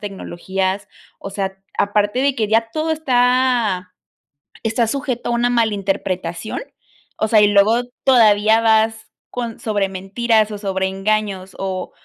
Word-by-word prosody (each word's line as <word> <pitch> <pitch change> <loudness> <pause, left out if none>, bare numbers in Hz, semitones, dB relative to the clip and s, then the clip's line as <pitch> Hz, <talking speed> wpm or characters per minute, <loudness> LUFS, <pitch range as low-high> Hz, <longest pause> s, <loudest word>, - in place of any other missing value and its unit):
tecnologías, 195 0 -3 0.3
o 195 - -7
sea, 195 -1 -3 0.2
aparte 205 +3 +1
de 275 0 +2
que 220 -4 -1
ya 225 +1 +2
todo 315 +1 -1
está 250 - +1 0.7
está 225 0 +1
sujeto 265 -2 -3
a - - 0
una 240 +1 +1
malinterpretación, 195 - -1 0.6
o 220 - +1
sea, 215 -1 +5
y 210 - +6
luego 205 +4 +4 0.2
todavía 220 -4 +5
vas 220 0 +1 0.2
con 235 -2 -5
sobre 205 -3 0
mentiras 215 +4 0
o 210 - -5
sobre 190 -2 -1
engaños, 195 -1 -2
o 190 -1 -4
215 Hz, 135 wpm, -19 LUFS, 195-235 Hz, 0.7 s, y